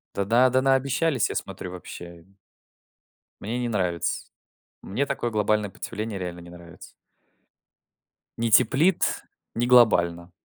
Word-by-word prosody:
Да-да, 115 Hz, +6 st, +3 dB
да, 130 Hz, +1 st, +2 dB
наобещались, 135 Hz, 0 st, +1 dB
я -, -, -5 dB
смотрю, 90 Hz, -, -5 dB
вообще. 85 Hz, -2 st, -10 dB, 1.2 s
Мне 110 Hz, +4 st, -3 dB
не 120 Hz, -1 st, -2 dB
нравится. 90 Hz, -6 st, -1 dB, 0.6 s
Мне 115 Hz, +9 st, -2 dB
такое 120 Hz, -3 st, -2 dB
глобальное 105 Hz, -1 st, 0 dB
потепление 105 Hz, +2 st, -6 dB
реально 90 Hz, -1 st, -6 dB
не 85 Hz, -, -13 dB
нравится. 85 Hz, -1 st, -13 dB, 1.5 s
Не 115 Hz, 0 st, 0 dB
теплит, 160 Hz, -, +3 dB, 0.3 s
не 120 Hz, +1 st, 0 dB
глобально. 85 Hz, -8 st, +4 dB
105 Hz, 115 wpm, -25 LUFS, 90-125 Hz, 1.5 s, глобально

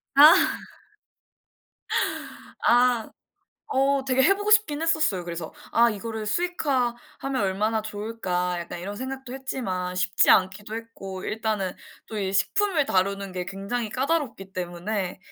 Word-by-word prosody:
아. 300 Hz, +3 st, +10 dB, 2.3 s
아. 245 Hz, -2 st, +4 dB, 0.6 s
어 275 Hz, 0 st, +2 dB
되게 265 Hz, 0 st, +3 dB
해 390 Hz, +9 st, +5 dB
보고 410 Hz, +1 st, -2 dB
싶긴 325 Hz, -9 st, +4 dB
했었어요, 315 Hz, -, +1 dB
그래서. 170 Hz, -2 st, -6 dB, 0.2 s
'아 235 Hz, +1 st, +5 dB
이거를 220 Hz, 0 st, -5 dB
수익화하면 270 Hz, -4 st, -1 dB
얼마나 215 Hz, +3 st, 0 dB
좋을까.' 205 Hz, -5 st, -2 dB
약간 170 Hz, 0 st, -6 dB
이런 200 Hz, +4 st, -5 dB
생각도 260 Hz, +2 st, -6 dB
했지만 190 Hz, -9 st, -3 dB
쉽지 180 Hz, 0 st, +3 dB
않기도 195 Hz, +3 st, +2 dB
했고 195 Hz, -5 st, -8 dB
일단은 215 Hz, -4 st, -2 dB, 0.3 s
또 220 Hz, -, -5 dB
이 195 Hz, -2 st, -1 dB
식품을 325 Hz, -, +2 dB
다루는 195 Hz, -2 st, 0 dB
게 180 Hz, -1 st, -4 dB
굉장히 200 Hz, +5 st, -3 dB
까다롭기 255 Hz, -, -2 dB
때문에 180 Hz, +2 st, -3 dB
220 Hz, 280 characters per minute, -25 LUFS, 190-265 Hz, 2.3 s, 아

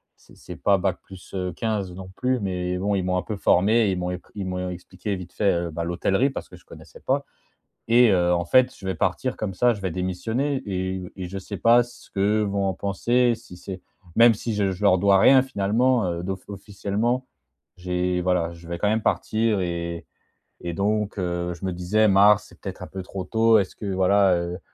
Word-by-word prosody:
c'est -, -, -21 dB
c'est -, -, -10 dB
pas 100 Hz, -1 st, +3 dB
bac 95 Hz, 0 st, -1 dB
plus, 95 Hz, 0 st, -14 dB
heu, 90 Hz, -2 st, -3 dB
15 105 Hz, -2 st, -2 dB
non 95 Hz, 0 st, -9 dB
plus, 125 Hz, 0 st, 0 dB
mais 90 Hz, -2 st, -2 dB
bon 100 Hz, +2 st, -1 dB
ils 95 Hz, -, 0 dB
m'ont 90 Hz, 0 st, 0 dB
un -, -, 0 dB
peu 110 Hz, -, -4 dB
formé, 105 Hz, +4 st, +3 dB
ils 95 Hz, -, -2 dB
m'ont 90 Hz, 0 st, -2 dB
éc 90 Hz, -, -5 dB
ils 100 Hz, -2 st, -4 dB
m'ont 90 Hz, 0 st, -3 dB
expliqué 95 Hz, +3 st, -5 dB
vite 90 Hz, -1 st, -9 dB
fait, 100 Hz, -2 st, +2 dB
heu, 85 Hz, 0 st, -2 dB
bah 85 Hz, +2 st, -3 dB
l'hôtellerie, 95 Hz, +9 st, +1 dB
parce -, -, -7 dB
que -, -, -12 dB
je -, -, -23 dB
connaissais -, -, -14 dB
pas, -, -, -1 dB, 0.6 s
et 120 Hz, -1 st, +6 dB
heu, 90 Hz, -2 st, +3 dB
en 85 Hz, -, -1 dB
fait 130 Hz, +7 st, +3 dB
je 95 Hz, -, -15 dB
vais 95 Hz, -, -1 dB
partir 110 Hz, +10 st, -1 dB
comme 100 Hz, -4 st, -4 dB
ça, 120 Hz, +3 st, +3 dB
je 100 Hz, -, -9 dB
vais 95 Hz, -, -1 dB
démissionner 110 Hz, +10 st, -2 dB
et 95 Hz, -1 st, -3 dB
et 90 Hz, -2 st, -5 dB
je 95 Hz, +1 st, -5 dB
sais 100 Hz, +1 st, -7 dB
pas 120 Hz, +4 st, +5 dB
ce 120 Hz, -, -16 dB
que 105 Hz, +2 st, +1 dB
vont 100 Hz, -1 st, -1 dB
en 95 Hz, -, -1 dB
penser 120 Hz, +6 st, +1 dB
si 90 Hz, -, -14 dB
c'est 95 Hz, 0 st, -8 dB, 0.4 s
même 115 Hz, 0 st, +7 dB
si 110 Hz, +1 st, -4 dB
je 100 Hz, -2 st, +1 dB
je 95 Hz, +3 st, -8 dB
leur 95 Hz, -2 st, +5 dB
dois 100 Hz, 0 st, +4 dB
rien 130 Hz, +6 st, +7 dB
finalement, 115 Hz, 0 st, +1 dB
heu, 85 Hz, 0 st, -3 dB
d'off 95 Hz, +1 st, -4 dB
officiellement, 105 Hz, +5 st, -2 dB, 0.5 s
j'ai 90 Hz, 0 st, -1 dB
voilà, 90 Hz, -2 st, 0 dB
je 85 Hz, 0 st, -14 dB
vais 85 Hz, -, -4 dB
quand 105 Hz, -, +1 dB
même 110 Hz, +1 st, +1 dB
partir 110 Hz, -2 st, +1 dB
et 85 Hz, -1 st, -3 dB, 0.6 s
et 85 Hz, -, -2 dB
donc, 105 Hz, +2 st, -1 dB
heu, 90 Hz, -1 st, -2 dB
je 85 Hz, +2 st, -8 dB
me 95 Hz, -, -2 dB
disais: 100 Hz, +5 st, +2 dB
«Mars 105 Hz, +2 st, +5 dB
c'est -, -, -19 dB
peut-être 95 Hz, -2 st, -7 dB
un -, -, -7 dB
peu 95 Hz, -1 st, -7 dB
trop 95 Hz, 0 st, -6 dB
tôt, 110 Hz, +1 st, +4 dB
est-ce 95 Hz, -, -3 dB
que 105 Hz, -, -8 dB
voilà, 95 Hz, 0 st, +4 dB
heu, 85 Hz, +1 st, -3 dB
95 Hz, 225 wpm, -24 LUFS, 90-110 Hz, 0.6 s, même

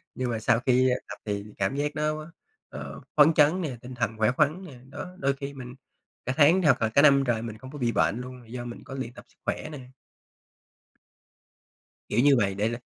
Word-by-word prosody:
Nhưng 130 Hz, -1 st, -2 dB
mà 115 Hz, -2 st, -2 dB
sau 115 Hz, +1 st, +2 dB
khi 130 Hz, +1 st, +3 dB, 0.2 s
tập -, -, -7 dB
thì 100 Hz, -1 st, -2 dB
cảm 95 Hz, +6 st, 0 dB
giác 145 Hz, +1 st, -2 dB
nó, 155 Hz, +1 st, -2 dB, 0.4 s
ờ, -, -, -8 dB, 0.2 s
phấn 150 Hz, +2 st, +7 dB
chấn 155 Hz, +5 st, +4 dB
nè, 140 Hz, -8 st, -4 dB
tinh 125 Hz, +1 st, -9 dB
thần 115 Hz, -2 st, -2 dB
khỏe 110 Hz, +1 st, +3 dB
khoắn 150 Hz, +7 st, +1 dB
nè, 135 Hz, -8 st, -12 dB
đó, 145 Hz, -, -7 dB
đôi 140 Hz, -3 st, +1 dB
khi 140 Hz, +1 st, -7 dB
mình 125 Hz, -2 st, -9 dB, 0.5 s
cả 130 Hz, -, -1 dB
tháng 160 Hz, +6 st, +6 dB
hoặc 145 Hz, -8 st, +3 dB
là 110 Hz, -, +2 dB
cả 125 Hz, +6 st, +4 dB
năm 140 Hz, -2 st, +6 dB
trời 120 Hz, -3 st, 0 dB
mình 115 Hz, -2 st, -6 dB
không 130 Hz, +3 st, -11 dB
có 150 Hz, -, -8 dB
bị 120 Hz, -4 st, 0 dB
bệnh 110 Hz, +2 st, +1 dB
luôn, 125 Hz, 0 st, -9 dB
là -, -, -18 dB
do 120 Hz, +1 st, -6 dB
mình 120 Hz, -1 st, -8 dB
có -, -, -9 dB
luyện 130 Hz, -3 st, -5 dB
tập -, -, -13 dB
sức -, -, -30 dB
khỏe -, -, -3 dB
nè. 150 Hz, -, -7 dB, 2.3 s
Kiểu 110 Hz, -, +1 dB
như 145 Hz, -1 st, +6 dB
vậy, 100 Hz, -4 st, +1 dB
để 105 Hz, +3 st, 0 dB
l 120 Hz, -, -3 dB
130 Hz, 230 wpm, -27 LUFS, 115-145 Hz, 2.3 s, phấn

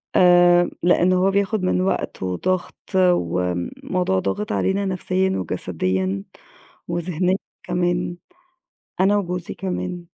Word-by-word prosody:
آآ 175 Hz, -1 st, +6 dB
لإن 175 Hz, +1 st, +4 dB
هو 185 Hz, +2 st, +3 dB
بياخُد 200 Hz, 0 st, 0 dB
من 185 Hz, 0 st, +1 dB
وقت 185 Hz, -, -2 dB
وضَغْط 175 Hz, -, -1 dB, 0.2 s
وم 90 Hz, -, +1 dB
الموضوع 180 Hz, -, 0 dB
ضاغط 100 Hz, +2 st, -2 dB
علينا 190 Hz, -, 0 dB
نَفْسيًا 185 Hz, 0 st, 0 dB
وجسديًا 95 Hz, -, -2 dB, 0.7 s
وذِهنيًا 175 Hz, +2 st, 0 dB, 0.3 s
كمان، 175 Hz, 0 st, -1 dB, 0.8 s
أنا 200 Hz, +2 st, +4 dB
وجوزي 180 Hz, -3 st, -3 dB
كمان. 180 Hz, -2 st, -4 dB
175 Hz, 105 wpm, -22 LUFS, -, 0.8 s, آآ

